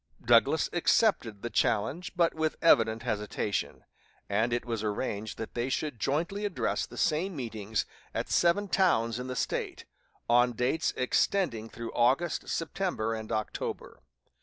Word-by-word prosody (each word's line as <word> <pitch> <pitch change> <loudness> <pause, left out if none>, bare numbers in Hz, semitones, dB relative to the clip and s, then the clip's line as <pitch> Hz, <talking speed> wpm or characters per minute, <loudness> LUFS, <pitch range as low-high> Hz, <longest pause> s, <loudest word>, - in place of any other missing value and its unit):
Douglas 135 +6 +4
accepted 170 - +2
the 120 - -3
challenge, 150 - 0
but 170 -1 +3
with 160 0 -1
evident 115 -7 +4
hesitation; 105 -3 -2 0.4
and 110 +4 +1
it 120 0 -1
was 115 -3 -3
arranged 105 0 -3
that 110 - -6
they 120 +2 -1
should 140 -3 -2
jointly 170 - -1
address 205 -3 -1
the - - -12
same 170 +4 +1
meetings 110 -5 -3 0.3
at - - -3
seven 185 +4 +2
towns 120 - +2
in 125 - -5
the 130 - -4
State, - - -3 0.4
on 120 +1 +4
dates 125 +8 0
extending 125 - +1
through 115 0 -7
August, 135 +8 +1
September, 165 - -1
and 110 -1 -6
October. 110 -1 -4
120 Hz, 140 wpm, -29 LUFS, 110-165 Hz, 0.4 s, Douglas